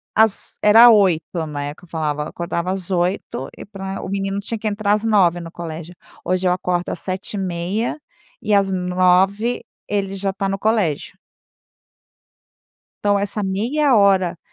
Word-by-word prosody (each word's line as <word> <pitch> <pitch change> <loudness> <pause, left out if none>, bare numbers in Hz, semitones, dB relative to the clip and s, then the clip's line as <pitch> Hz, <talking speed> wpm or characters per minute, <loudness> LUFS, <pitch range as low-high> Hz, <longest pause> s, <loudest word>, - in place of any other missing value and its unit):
às 220 -2 +2
era 225 +3 +8
8h, 180 -6 +2
né, 145 -1 -4
que - - -21
eu - - -15
falava. 150 -3 -2
Eu - - -6
acordava 170 +1 -3
às 190 -1 -3
8h 175 -6 -1
e - - -9
pra 195 -1 -6
o - - -6
menino 195 0 -2
tinha 215 +3 -4
que 215 0 -4
entrar 205 0 0
às 210 +1 0
9h 185 -6 +3
no 165 -1 -9
colégio. 165 0 -7 0.3
Hoje 185 0 0
eu 180 - +3
acordo 180 -1 -2
às - - -5
7h30, 190 - -3 0.4
e 210 - 0
às 195 -1 +3
9h 185 +5 +1 0.2
ele 195 -1 -1
já 195 0 -1
tá 195 0 -3
no 195 0 -1
colégio. 205 -8 -1 1.9
Então, 205 -1 +3
essa 205 +1 -2
meia 240 +8 +1
hora, 190 -4 +3
195 Hz, 160 wpm, -20 LUFS, 175-205 Hz, 1.9 s, era